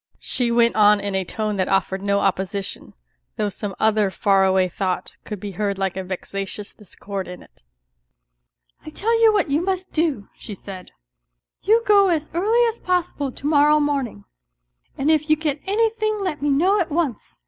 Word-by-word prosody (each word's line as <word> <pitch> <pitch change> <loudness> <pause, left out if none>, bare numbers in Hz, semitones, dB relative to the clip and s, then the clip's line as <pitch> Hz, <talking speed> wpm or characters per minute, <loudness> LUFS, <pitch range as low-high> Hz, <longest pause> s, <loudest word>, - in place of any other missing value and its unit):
she 245 -2 -1
went 235 0 +3
on 210 -1 +5
in 200 0 -3
a 190 0 0
tone 210 +3 -3
that 185 - 0
offered 195 0 0
no 200 0 +1
opposition, 195 +1 -2 0.4
though 210 -1 -1
some 200 -1 -5
other 215 -2 +3
far 195 0 +2
away 190 -1 +3
thought 185 +1 -3
could 210 -3 -6
be 205 +1 -6
heard 200 0 -2
like 190 -1 -1
a 190 - -3
vexatious 195 +2 -5
discord 200 -1 -7
in 180 0 -9
it. - - -17 0.6
" - - -49
I - - -8
tell 455 +8 0
you 450 -1 +7
what 400 -8 0
you 295 +3 +2
must 375 0 -3
do," 305 -11 0
she 205 - -9
said, 190 -1 -10 0.7
"you 450 +3 +3
go 400 -2 +5
as 315 -4 -1
early 440 +8 +3
as 455 0 -3
possible 350 -6 -1
to 275 - -12
morrow 300 0 +4
morning, 280 - -2 0.7
and 285 +3 +2
if 310 0 +1
you 310 - +6
get 300 -2 -2
anything 435 +1 +1
let 365 -7 -3
me 290 - 0
know 360 +9 +3
at 340 - -2
once. 295 - -3
235 Hz, 185 wpm, -22 LUFS, -, 0.7 s, you